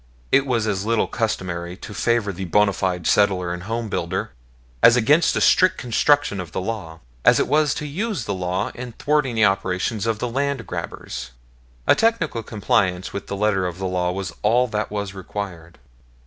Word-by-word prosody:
It 140 0 +4
was 115 -4 +1
as 100 -3 -1
little 115 +1 +1
customary 90 -6 -3
to 105 - -9
favor 115 -3 +1
the 95 +1 -5
bona 100 +3 +3
fide 90 -3 -2
settler 95 -4 +2
and 90 - -6
home 115 +4 -3
builder, - - -2 0.5
as 115 - +8
against 145 +8 +4
the - - 0
strict 185 -1 +4
construction 140 -1 +2
of 90 -4 -7
the - - -1
law, 95 -6 -5 0.2
as - - +6
it - - +1
was 150 -1 +2
to 150 - -4
use 180 - -3
the - - -2
law 90 0 -2
in 120 -1 -7
thwarting 145 -2 0
the 110 -1 +4
operations 95 +3 0
of 115 -1 +1
the 125 - -2
land 135 0 -1
grabbers. 70 -7 -6 0.6
A - - +6
technical 225 - +1
compliance 100 -5 0
with 100 - -5
the 100 - -4
letter 100 -3 +1
of 90 -1 -6
the 95 - -4
law 90 -1 0
was 95 -2 -4
all 120 +4 +3
that 105 -1 -2
was 100 -2 -4
required. 90 -4 -7
105 Hz, 190 wpm, -22 LUFS, 90-120 Hz, 0.6 s, as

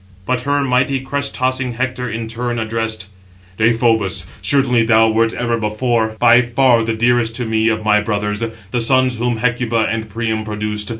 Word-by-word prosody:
But 125 +2 -1
her 145 +2 0
mighty 130 +1 +1
crest 140 +1 -4
tossing 130 -1 -1
Hector 125 0 -3
in 115 0 -4
turn 120 +1 -3
addressed: 110 -3 -3 0.5
"Deïphobus, 110 -5 +1 0.2
surely 130 -4 +2
thou 110 0 +4
wert 115 +1 +2
ever 120 -1 -2
before 110 +1 -1
by 120 +3 +5
far 120 0 +2
the 115 0 -2
dearest 120 0 +1
to 120 0 -2
me 110 0 +1
of 110 -1 -2
my 105 -1 +4
brothers, 105 0 -2 0.3
the 120 - 0
sons 130 +1 +2
whom 120 0 -1
Hecuba 115 -1 0
and 110 -1 -4
Priam 110 0 -2
produced. 105 -1 -3
115 Hz, 170 wpm, -17 LUFS, 110-125 Hz, 0.5 s, by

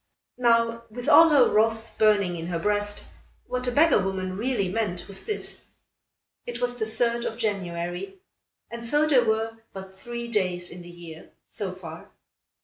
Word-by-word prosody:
Now 230 -1 +3
with 245 +3 -7
all 330 - +8
her 285 -5 +6
wrath 225 +1 +1
burning 205 -4 +3
in 165 0 -5
her 175 -1 -2
breast, 205 +3 -1 0.4
what 250 0 -3
the 250 - 0
beggar 305 -1 +5
woman 185 -1 -2
really 220 -2 0
meant 185 -3 -2
was 195 -1 -6
this: 425 - -4 0.8
It 240 0 -5
was 245 0 -1
the 220 - -1
third 235 +1 0
of 225 - -4
January, 185 - -3 0.5
and 235 0 -6
so 295 +6 +2
there 275 -5 +4
were 225 +1 -1
but 190 0 -10
three 235 +2 -6
days 180 -6 -1
in 180 - -9
the 175 - -11
year, 170 -2 -11 0.2
so 200 -3 -4
far. 170 -3 -10
220 Hz, 165 wpm, -26 LUFS, 185-235 Hz, 0.8 s, all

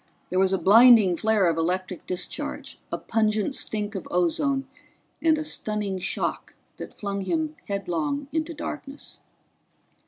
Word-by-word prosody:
There 185 - +1
was 190 0 +3
a 190 - +2
blinding 220 -2 +7
flare 215 0 +2
of 165 -1 +1
electric 180 +2 -2
discharge, 180 - -4
a - - -1
pungent 215 +2 0
stink 210 -4 -2
of 195 - -6
ozone 270 - +1 0.5
and 320 0 +4
a 310 - -2
stunning 210 -9 -3
shock - - -3 0.2
that - - -8
flung 200 -1 -3
him 315 - -1
headlong 200 - -2
into 320 +1 -2
darkness. 290 -1 -7
210 Hz, 135 wpm, -25 LUFS, 185-275 Hz, 0.5 s, blinding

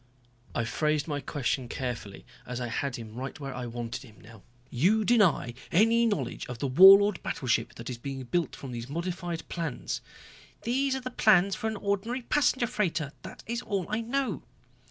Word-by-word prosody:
I 115 - 0
phrased 150 +5 0
my 145 -2 -2
question 135 -2 -2
carefully, 120 -6 -5 0.2
as 125 0 -4
I 120 -1 -3
had 130 +3 -2
him 110 -2 -8
right 130 +6 -6
where 135 -2 -5
I 125 -1 -5
wanted 120 +1 -5
him 115 -6 -15
now. 115 -1 -14 0.3
"You 200 - +3
deny 200 - +3 0.2
any 230 +5 +4
knowledge 145 - -2
of 125 - -6
the 140 - -3
Warlord 195 +8 +8
battleship 125 -4 -1
that 115 - -9
is 125 -2 -5
being 135 +1 -5
built 170 +6 -1
from 135 - -8
these 120 +1 -6
modified 170 +1 -4
plans." 165 -7 -4 0.6
"These 265 +3 +1
are 265 - -3
the 255 0 -5
plans 200 -5 +4
for 220 - -2
an 220 - -2
ordinary 200 +6 -2
passenger 260 -2 +2
freighter, 170 - -1
that - - -10
is 235 +1 -3
all 195 -6 -2
I 215 +2 -1
know." 265 +3 -1
165 Hz, 180 wpm, -28 LUFS, -, 0.6 s, Warlord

